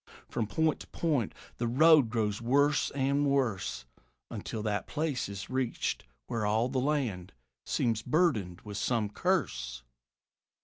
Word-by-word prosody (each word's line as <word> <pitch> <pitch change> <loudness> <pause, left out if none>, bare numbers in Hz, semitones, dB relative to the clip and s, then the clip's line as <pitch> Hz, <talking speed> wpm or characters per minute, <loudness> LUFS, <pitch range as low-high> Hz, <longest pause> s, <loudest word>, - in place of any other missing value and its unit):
From 110 - -2
point 160 +7 +1
to - - -10
point 145 -10 0 0.3
the 120 - -1
road 150 +1 +6
grows 110 -2 -1
worse 145 +5 +3
and 140 +1 +1
worse, 125 - 0 0.5
Until 110 - -5
that 105 -1 -1
place 150 -7 -2
is 100 0 -6
reached 130 -2 -2 0.2
where 115 - -2
all 110 +4 +2
the 130 0 0
land 125 -11 -1 0.3
Seems 115 -2 +1
burdened 115 - +1
with 105 -2 -7
some 110 -2 0
curse. 65 - -1
120 Hz, 135 wpm, -30 LUFS, 105-145 Hz, 0.5 s, road